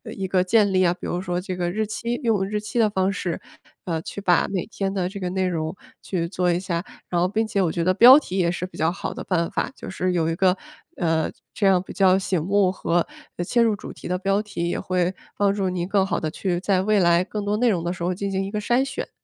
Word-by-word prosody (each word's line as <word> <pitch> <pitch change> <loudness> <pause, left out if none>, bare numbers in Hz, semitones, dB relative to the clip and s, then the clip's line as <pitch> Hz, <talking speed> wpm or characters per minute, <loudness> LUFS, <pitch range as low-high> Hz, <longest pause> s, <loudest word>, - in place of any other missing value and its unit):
一 195 - -3
个 185 0 +2
建 205 +1 +3
立 185 -1 +3
啊。 175 - +3
比 180 - -10
如 175 - -2
说 180 -1 -2
这 185 0 -4
个 175 -1 -1
日 215 +2 -1
期 235 +3 -3
用 210 -5 +2
日 210 0 -2
期 235 +3 -3
的 220 -2 +4
方 190 -1 +1
式， 175 -4 -3 0.4
呃， 165 -3 -2
去 200 - -7
把 180 -3 +3
每 190 -3 -2
天 195 -3 -3
的 185 -2 -1
这 200 0 -7
个 180 - -2
内 190 0 0
容 160 0 -2 0.3
去 170 -3 -2
做 180 -1 0
一 170 - +1
下， 175 -1 -3 0.2
然 175 - 0
后 180 - +3
并 220 +4 0
且 205 -2 0
我 170 -3 +1
觉 170 - -1
得 185 +1 +3
标 250 +7 +9
题 195 -9 -5
也 170 -2 +2
是 180 +1 -3
比 185 - -12
较 160 +1 +2
好 190 - -5
的 - - -6
办 170 -3 0
法， - - -1
就 - - -9
是 185 -1 -1
有 165 -2 +1
一 165 - -1
个， 185 0 +3 0.4
呃， 165 -2 0 0.3
这 205 - 0
样 185 -2 +4
比 - - -10
较 190 -1 +4
醒 185 -3 -1
目 195 +2 +2
和 175 -2 0 0.4
切 235 +4 +2
入 225 -2 +3
主 - - -9
题 - - -9
的 180 +1 0
标 195 +2 +1
题， 185 -5 -3
也 - - -2
会 180 0 0 0.2
帮 200 -1 +3
助 195 -2 -1
您 175 -1 -2
更 195 -1 +2
好 - - -1
地 155 - -2
去 180 -1 -2
在 190 -1 +1
未 210 +1 +2
来 170 0 +4
更 205 +1 -5
多 205 +1 0
内 245 +1 +2
容 175 -5 0
的 175 - -1
时 175 -1 -6
候 180 +1 0
进 200 +2 -3
行 195 0 -1
一 195 - -6
个 210 0 -2
筛 245 +5 +2
选。 275 +1 -5
185 Hz, 295 characters per minute, -23 LUFS, 175-200 Hz, 0.4 s, 标